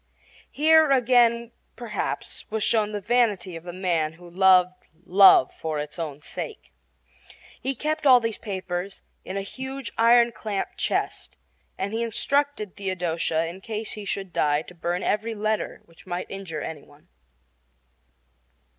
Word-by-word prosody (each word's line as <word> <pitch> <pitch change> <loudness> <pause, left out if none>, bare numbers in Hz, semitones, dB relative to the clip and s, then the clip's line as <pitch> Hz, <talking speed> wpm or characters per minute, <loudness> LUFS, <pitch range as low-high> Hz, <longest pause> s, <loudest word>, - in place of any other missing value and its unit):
Here 315 +1 +5
again, 240 -3 +3 0.2
perhaps, 220 -4 -5
was 220 -1 -1
shown 215 -2 +2
the 205 -1 -4
vanity 210 -6 +1
of 165 - -8
the 175 - -5
man 170 -4 -1
who 175 +1 -15
loved 185 0 +3 0.2
love 190 -8 +7
for 160 -1 -4
its 150 +3 -5
own 150 -3 -5
sake. 440 - -7 0.9
He 270 0 -2
kept 305 +3 -1
all 255 -2 +8
these 230 -2 -3
papers 190 -2 -5 0.2
in 190 - -5
a 195 - -2
huge 265 +2 -6
iron 235 +1 +6
clamped 210 -4 -4
chest, - - -2 0.4
and 200 +2 -3
he 225 - -1
instructed 235 -1 -1
Theodosia 170 -4 -1
in 175 +3 -7
case 220 +1 -5
he 210 - -6
should 195 -2 -4
die 150 0 +1
to 180 - -13
burn 175 +1 -3
every 220 +2 -1
letter 215 +1 -2
which 165 +2 -20
might 175 0 -4
injure 185 -6 -5
any 155 -3 -6
one. 145 - -21
200 Hz, 145 wpm, -25 LUFS, 175-235 Hz, 0.9 s, all